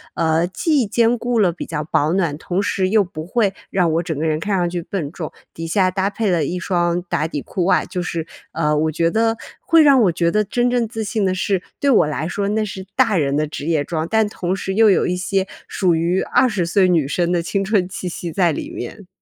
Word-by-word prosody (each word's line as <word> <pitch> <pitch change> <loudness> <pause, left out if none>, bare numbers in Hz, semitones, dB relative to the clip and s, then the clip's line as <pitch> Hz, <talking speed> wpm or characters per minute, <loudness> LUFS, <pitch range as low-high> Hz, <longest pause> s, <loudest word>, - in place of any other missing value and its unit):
呃 160 +1 +1
既 290 - +1
兼 235 +3 +2
顾 240 0 -1
了 190 -5 +4
比 170 - -7
较 150 -2 -3
保 150 +1 +1
暖， 170 -6 0
同 180 +4 -2
时 195 -2 0
又 210 +2 +3
不 160 -4 -8
会 205 -1 +1 0.2
让 180 -4 +1
我 165 +2 +1
整 160 -4 -4
个 155 - -2
人 155 -1 0
看 200 +3 -1
上 175 -1 +1
去 175 0 -3
笨 165 -4 -4
重， 160 -3 -6 0.2
底 165 0 -6
下 185 +2 +2
搭 190 +1 0
配 210 +1 -1
了 170 -5 +1
一 180 - -3
双 175 -1 0
打 155 - 0
底 150 -3 -4
裤 180 +4 -3
外， 190 - +3
就 180 - -4
是， 170 -2 -3 0.3
呃 150 -2 +1
我 155 +1 +1
觉 165 +1 +1
得 225 +2 +1 0.2
会 330 -1 +4
让 280 -4 +6
我 185 - +3
觉 170 0 0
得 210 +3 +2
真 240 +4 +1
正 245 -2 +1
自 220 0 -4
信 215 0 -1
的 185 - +1
是， 190 0 0 0.2
对 280 - +2
我 220 - +4
来 150 +1 -3
说 200 +2 -2
那 215 +1 0
是 190 -2 -6
大 230 -6 +3
人 140 -3 +1
的 155 +1 0
职 145 - -7
业 160 -3 +1
装， 160 +1 -3
但 220 -1 +2
同 185 -2 -2
时 190 0 -4
又 220 0 +6
有 - - +2
一 180 - 0
些 190 +1 -1 0.2
属 180 -4 +1
于 170 +3 +1
20 235 -8 +1
岁 185 +3 +3
女 165 -6 +2
生 170 +4 0
的 175 -1 +1
青 195 +4 -1
春 195 -3 +1
气 185 -1 -5
息 175 -1 -5
在 175 -1 +2
里 145 - -5
面。 185 - -8
180 Hz, 260 characters per minute, -20 LUFS, 165-205 Hz, 0.3 s, 让